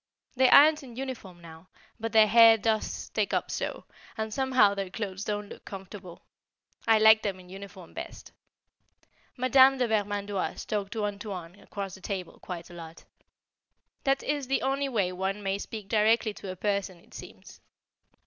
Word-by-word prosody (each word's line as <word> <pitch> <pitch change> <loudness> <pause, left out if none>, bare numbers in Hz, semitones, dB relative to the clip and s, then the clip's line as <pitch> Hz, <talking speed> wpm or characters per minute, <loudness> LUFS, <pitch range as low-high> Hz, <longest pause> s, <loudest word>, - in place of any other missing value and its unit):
They 260 0 +4
aren't 305 +2 +7
in 250 -4 -12
uniform 235 -9 -7
now, 165 +1 -13 0.3
but 225 0 -3
their 220 -1 +6
hair 225 +1 +7
does 220 0 0
stick - - -2
up - - -2
so, - - -4 0.3
and 220 0 -3
somehow 260 -6 +3
their 195 -2 -4
clothes 195 -1 -5
don't 210 -1 -3
look - - -11
comfortable. 190 -2 -10 0.6
I 225 -1 +6
liked 220 0 +7
them 195 -3 -3
in 180 -1 -15
uniform 195 -2 -11
best. - - -9 1.1
Madame 260 +2 +5
de 250 -2 +1
Vermandoise 205 -2 -2
talked 205 -1 -3
to 220 -2 -2
"Antoine" 200 -4 -6
across 200 -2 -7
the 190 - -12
table 185 -3 -6
quite 175 -2 -8
a - - -12
lot. 165 -1 -11 1.0
That 270 0 +1
is 290 -2 -2
the 270 - 0
only 275 +1 0
way 200 -8 0
one 190 +3 -3
may 195 0 -1
speak 215 -1 -7
directly 220 +1 +2
to 200 - -9
a - - -7
person, 200 -1 -2
it 170 - -22
seems. - - -12
205 Hz, 170 wpm, -28 LUFS, 190-230 Hz, 1.1 s, aren't